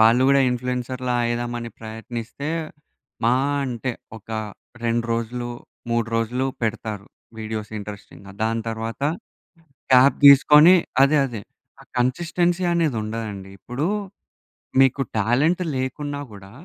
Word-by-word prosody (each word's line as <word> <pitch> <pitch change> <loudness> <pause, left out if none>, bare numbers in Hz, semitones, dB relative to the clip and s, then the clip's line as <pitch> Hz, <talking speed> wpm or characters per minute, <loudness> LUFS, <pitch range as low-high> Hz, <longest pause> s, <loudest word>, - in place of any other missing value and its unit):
వాళ్ళు 115 +3 +6
కూడా 140 0 +5
ఇన్‌ఫ్లుయెన్సర్‌లా 125 0 -2
అయిదాం 120 0 -2
అని 115 0 -6
ప్రయత్నిస్తే 115 +4 -6 0.8
మా 120 +2 +4 0.3
అంటే 125 -1 -3 0.3
ఒక 110 - -17 0.5
2 115 0 +1
రోజులు, 120 +1 -3 0.4
3 115 -1 +1
రోజులు 120 +3 0 0.2
పెడతారు. 110 -2 -3 0.3
వీడియోస్ 110 -1 -5
ఇంట్రెస్టింగ్‌గా. 100 -1 -10
దాని 115 +1 0
తరువాత 115 +3 -5 0.9
గ్యాప్ 130 +1 +6
తీసుకొని 150 +4 +8 0.3
అదే 140 +3 +5
అదే 120 -5 -6 0.4
ఆ - - -14
కన్‌సిస్టెన్సీ 170 +8 +1
అనేది 165 -6 +1
ఉండదండి. 105 -3 -5
ఇప్పుడు 125 +9 -4 0.9
మీకు 135 0 +4 0.2
టాలెంట్ 135 - +2
లేకున్నా 145 +3 -3
కూడా 100 -1 -12
120 Hz, 110 wpm, -23 LUFS, 110-135 Hz, 0.9 s, తీసుకొని